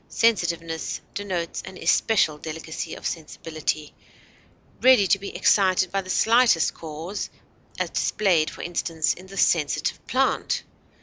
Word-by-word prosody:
Sensitiveness 170 -7 0
denotes 185 -4 -3
an 190 -1 -10
especial 180 -9 +2
delicacy 160 +1 -6
of - - -11
sensibility, 155 -1 -4 0.9
ready 255 -5 +6
to 200 +1 +3
be 200 - -7
excited 185 -2 +3
by 195 - 0
the 185 - -12
slightest 230 -4 +4
cause, 165 +5 -6 0.5
as - - -2
displayed, 175 -7 +2
for - - -9
instance, 165 -2 -1
in 185 +2 -13
the 195 +1 -10
"sensitive 155 -6 +1
plant." - - 0
175 Hz, 125 wpm, -24 LUFS, 160-195 Hz, 0.9 s, ready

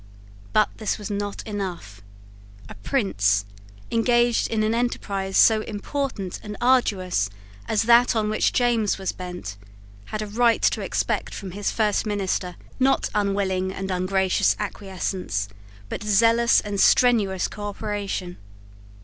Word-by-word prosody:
But 215 - +3
this 215 - -1
was 210 0 -6
not 205 0 -4
enough. 180 - -5 0.7
A - - -9
prince, 105 - 0 0.5
engaged 240 0 +2
in 220 -1 0
an 215 +1 +1
enterprise 200 -5 -1
so 220 -1 +6
important 215 -2 -4
and 210 -1 -7
arduous 195 - +2 0.4
as 215 - +1
that 240 +1 +5
on 215 -1 +1
which 215 0 +1
James 235 -4 +1
was 190 -1 -2
bent, 180 - -7 0.5
had 215 - -4
a - - -4
right 230 +2 +2
to - - +2
expect - - -2
from 190 -2 -7
his 200 +2 -2
first 215 -1 0
minister, 190 -3 -2 0.2
not 265 +1 +2
unwilling 195 -2 0
and 190 0 -5
ungracious 185 +1 +1
acquiescence, 190 - -3 0.4
but - - -5
zealous 230 +3 +4
and 205 -1 -4
strenuous 210 -7 +4
cooperation. 205 -3 -4
205 Hz, 130 wpm, -24 LUFS, 190-225 Hz, 0.7 s, so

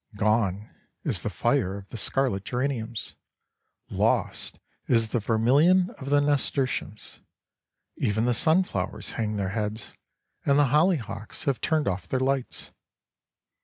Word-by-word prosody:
Gone 105 -1 0 0.3
is - - +1
the - - -2
fire 100 -9 0
of 100 -1 -11
the - - -9
scarlet 120 -4 0
geraniums; 120 -4 -3 0.8
lost - - 0 0.3
is 115 -2 +2
the 120 - 0
vermilion 140 - +3
of 135 - -6
the 145 0 +4
nasturtiums; 140 -6 -1 0.8
even 110 +2 0
the 125 - +2
sunflowers 115 - +1
hang 110 -2 -2
their 95 -2 -1
heads, 105 +1 -4 0.5
and 140 0 +3
the 145 -3 +4
hollyhocks 150 - 0
have 140 -5 -1
turned 155 -2 +1
off 90 -2 -2
their 130 - -1
lights. 135 -1 -2
120 Hz, 130 wpm, -26 LUFS, 105-140 Hz, 0.8 s, the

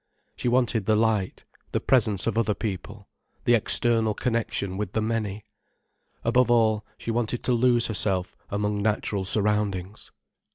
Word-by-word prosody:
She - - -3
wanted 120 -4 +1
the 110 - +4
light, 110 -3 0 0.3
the - - +2
presence 110 -7 +2
of 115 - 0
other 110 -2 +1
people, 105 0 -6 0.4
the 120 - +4
external 115 -1 +2
connection 115 -5 -1
with 100 -1 -4
the 110 - 0
many. 110 -2 -2 0.8
Above 120 +1 +3
all 110 -3 +3
she 115 - -4
wanted 120 +1 -2
to 125 - +1
lose 120 0 +3
herself 95 -4 -1
among 105 0 -1
natural 105 -2 0
surroundings. 105 -1 -1
110 Hz, 140 wpm, -25 LUFS, 100-115 Hz, 0.8 s, the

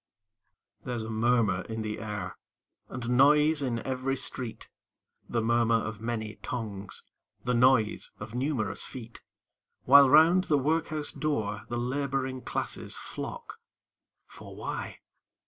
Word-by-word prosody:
There's 120 -3 -3
a 110 - -5
murmur 110 -4 +2
in 110 0 -4
the 105 0 -4
air, 105 -4 -5 0.5
And 125 -1 -5
noise 150 +4 +5
in 120 -4 -2
every 130 +1 -1
street 125 -2 -3 0.6
The 115 -2 0
murmur 115 0 +3
of 110 -1 -2
many 110 -2 -3
tongues, 105 -5 -5 0.4
The 125 - 0
noise 120 -3 +3
of 105 +2 -8
numerous 125 -4 -1
feet 115 -3 -9 0.6
While 140 +1 +8
round 165 +6 +6
the 150 - +3
Workhouse 155 +1 -1
door 110 -9 -2
The 120 - -2
Laboring 130 +1 -2
Classes - - -2
flock, - - -7 0.7
For - - -12
why? - - -5
120 Hz, 125 wpm, -29 LUFS, 110-135 Hz, 0.7 s, While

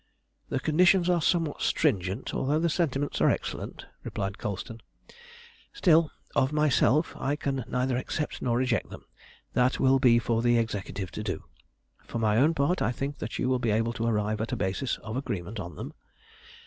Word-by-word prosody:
"The 130 - -1
conditions 175 +4 +4
are 175 -2 +2
somewhat 165 -1 +1
stringent, 100 - 0
although 145 +3 +1
the 170 +2 +1
sentiments 145 -4 -1
are - - +5
excellent," - - -3 0.2
replied 100 0 -4
Colston; 105 +3 -5 0.9
"still, 165 - +4 0.3
of 130 +1 +3
myself 150 -1 +2
I 140 +2 0
can 135 -3 -2
neither 125 0 0
accept 150 +4 -3
nor 120 -2 +1
reject 125 -5 0
them. - - -11 0.5
That 125 +1 +2
will 135 0 +4
be 120 -2 +5
for 115 0 +1
the 120 0 +3
Executive 105 -4 -3
to - - -5
do. 95 -6 -4 0.6
For - - -4
my 110 -2 +2
own 150 +6 +4
part 165 +6 +1
I - - +2
think 140 +3 -4
that 110 - -4
you - - 0
will 130 -1 +2
be 120 - 0
able 115 +2 +1
to 115 -1 -2
arrive 105 -1 0
at 110 - -3
a - - 0
basis 105 +6 -1
of 110 +1 -5
agreement 105 -5 -4
on 85 -5 -6
them. - - -7
125 Hz, 180 wpm, -28 LUFS, 110-145 Hz, 0.9 s, are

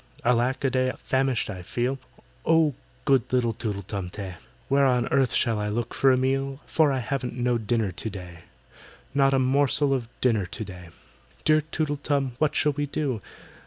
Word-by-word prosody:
"ALACK 125 +3 +2
A 135 - +3
DEY, 130 0 +2
famished 130 -3 0
I 95 -4 -6
feel; 125 +8 -2 0.4
Oh, 160 -2 +4 0.3
good 135 -4 +3
little 120 -3 +2
TOOTLE 105 -2 -4
TUM 95 -1 -4
TEH, 95 -1 -6 0.3
Where 140 0 +4
on 125 -2 +2
earth 135 -2 +3
shall 115 -4 +1
I 105 0 -1
look 115 +3 -2
for 135 - +4
a 130 - +4
meal? 135 +1 0
For 155 -3 +3
I 135 - 0
haven't 125 0 -3
no 120 -1 +1
dinner 110 -2 0
to 110 - -4
day!— 90 -4 -9 0.7
Not 135 -1 +4
a - - +4
morsel 135 +2 +3
of 120 -4 -2
dinner 110 -7 +2
to 110 +3 -5
day! 90 -3 -10 0.6
"Dear 155 0 +5
TOOTLE 155 -1 -2
TUM, 140 -2 0
what 155 -1 +2
shall 150 - +3
we 145 +1 -2
do? 135 -6 -2
130 Hz, 185 wpm, -26 LUFS, 110-135 Hz, 0.7 s, Dear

